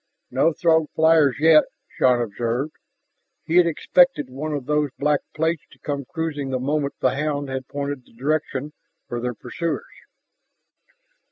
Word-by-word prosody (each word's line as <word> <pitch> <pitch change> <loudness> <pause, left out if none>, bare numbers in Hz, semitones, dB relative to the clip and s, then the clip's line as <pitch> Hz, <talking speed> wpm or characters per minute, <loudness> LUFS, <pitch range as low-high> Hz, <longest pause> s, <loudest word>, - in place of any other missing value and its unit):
"No 135 +6 +3
Throg 160 -1 +2
flyers 160 -3 +4
yet," 155 0 +6 0.2
Shann 125 -1 +2
observed. 120 +6 -2 0.7
He 165 - +1
had 180 -1 +6
expected 170 - +3
one 150 +4 -4
of 145 -4 -3
those 150 0 +1
black 145 0 +2 0.2
plates 160 0 0
to - - -19
come 140 -2 -4
cruising 150 -3 -3
the 130 - 0
moment 140 +2 -1
the 130 - +3
hound 145 -1 -2
had 130 0 -4
pointed 140 -2 -4
the - - -23
direction 145 +2 -2 0.3
for 120 - -4
their 125 0 -3
pursuers. 170 +8 -4
145 Hz, 150 wpm, -23 LUFS, 130-155 Hz, 0.7 s, yet